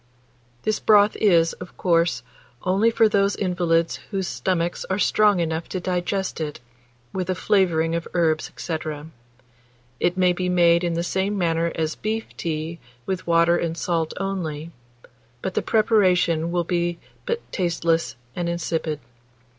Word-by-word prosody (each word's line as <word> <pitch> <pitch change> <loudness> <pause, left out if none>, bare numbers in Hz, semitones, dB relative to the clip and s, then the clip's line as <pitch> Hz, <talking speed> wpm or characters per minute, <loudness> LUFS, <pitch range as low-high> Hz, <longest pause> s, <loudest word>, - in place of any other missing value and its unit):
This 215 -1 0
broth 210 -1 +5
is, 170 -6 +4
of 180 - -11
course, 170 -1 +2 0.4
only 195 +5 +3
for 225 -1 +4
those 200 -1 +2
invalids 175 -3 +1
whose 195 -3 -2
stomachs 175 -2 -1
are 190 - -1
strong 205 -1 +3
enough 160 0 -2
to 185 - -3
digest 180 0 -2
it, 150 -4 -4 0.5
with 185 -1 -3
a 185 - +1
flavouring 170 -5 +2
of 170 0 -2
herbs, 160 -3 +1
&c. 165 -2 -3 1.2
It 175 +1 +1
may 180 -1 +4
be 180 +1 -2
made 170 -1 +4
in 170 -1 0
the 170 - -1
same 190 +3 -1
manner 170 -2 +1
as 160 -1 -1
beef 220 +1 -3
tea, 160 +1 -4 0.3
with 185 -2 -3
water 170 0 +4
and 165 -1 -2
salt 165 -2 -1
only; 170 -5 -3 0.7
but 190 - -2
the - - +1
preparation 180 -7 +3
will 175 0 0
be 175 0 -1 0.3
but 470 - 0
tasteless 170 -2 0 0.2
and 175 -1 -2
insipid. 165 -3 -2
175 Hz, 145 wpm, -23 LUFS, 165-190 Hz, 1.2 s, broth